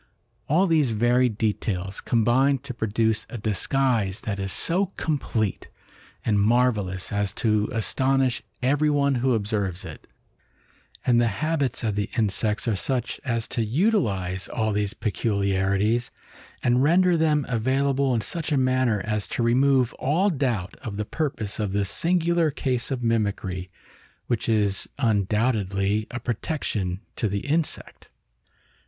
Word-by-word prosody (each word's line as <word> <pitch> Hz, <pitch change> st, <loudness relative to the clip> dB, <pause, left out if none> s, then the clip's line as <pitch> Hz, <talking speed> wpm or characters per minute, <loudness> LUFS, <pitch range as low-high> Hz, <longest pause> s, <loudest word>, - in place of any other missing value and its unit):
All 170 Hz, +7 st, +4 dB
these 155 Hz, -9 st, +2 dB
varied 120 Hz, 0 st, +2 dB
details 100 Hz, -3 st, -2 dB
combine 125 Hz, +4 st, +3 dB
to 135 Hz, -, -5 dB
produce 110 Hz, -1 st, 0 dB
a 120 Hz, -, -6 dB
disguise 110 Hz, -1 st, 0 dB
that 100 Hz, -2 st, -3 dB
is 95 Hz, 0 st, -2 dB
so 185 Hz, -, +2 dB
complete 115 Hz, -9 st, -2 dB, 0.6 s
and 105 Hz, -2 st, +2 dB
marvellous 105 Hz, -4 st, +1 dB
as 100 Hz, -1 st, 0 dB
to 110 Hz, -2 st, +1 dB
astonish 130 Hz, +3 st, +1 dB, 0.2 s
everyone 145 Hz, +1 st, +2 dB
who 130 Hz, 0 st, +1 dB
observes 100 Hz, -4 st, -2 dB
it; -, -, -10 dB, 1.0 s
and 120 Hz, -1 st, +4 dB
the 120 Hz, -, +3 dB
habits 140 Hz, +5 st, -1 dB
of 110 Hz, -2 st, 0 dB
the 105 Hz, 0 st, -2 dB
insects 105 Hz, 0 st, 0 dB
are 110 Hz, -, +2 dB
such 125 Hz, +4 st, -2 dB
as 115 Hz, -3 st, -1 dB
to 115 Hz, -, -1 dB
utilize 105 Hz, -, 0 dB
all 110 Hz, -2 st, -1 dB
these 105 Hz, 0 st, -1 dB
peculiarities, 100 Hz, +1 st, 0 dB, 0.5 s
and 125 Hz, +1 st, +3 dB
render 175 Hz, +5 st, +4 dB
them 155 Hz, -3 st, +2 dB
available 135 Hz, +2 st, +1 dB
in 115 Hz, -, 0 dB
such 160 Hz, +7 st, -3 dB
a 145 Hz, -, +3 dB
manner 130 Hz, -5 st, +2 dB
as 105 Hz, -1 st, -1 dB
to 120 Hz, -, -2 dB
remove 130 Hz, +1 st, +3 dB
all 180 Hz, +9 st, +2 dB
doubt 120 Hz, -, -1 dB
of 110 Hz, -6 st, -6 dB
the 105 Hz, -, -2 dB
purpose 115 Hz, -8 st, -3 dB
of 105 Hz, -3 st, -1 dB
this 100 Hz, -1 st, 0 dB
singular 170 Hz, -1 st, +2 dB
case 130 Hz, -4 st, -2 dB
of 130 Hz, -3 st, -3 dB
mimicry, 100 Hz, -5 st, -1 dB, 0.6 s
which 120 Hz, -1 st, -1 dB
is 105 Hz, -3 st, +1 dB
undoubtedly 105 Hz, -3 st, +1 dB
a 120 Hz, -, -5 dB
protection 110 Hz, -, -3 dB
to 110 Hz, -, 0 dB
the 100 Hz, 0 st, -2 dB
insect. 155 Hz, +2 st, -3 dB
115 Hz, 135 wpm, -25 LUFS, 105-135 Hz, 1.0 s, All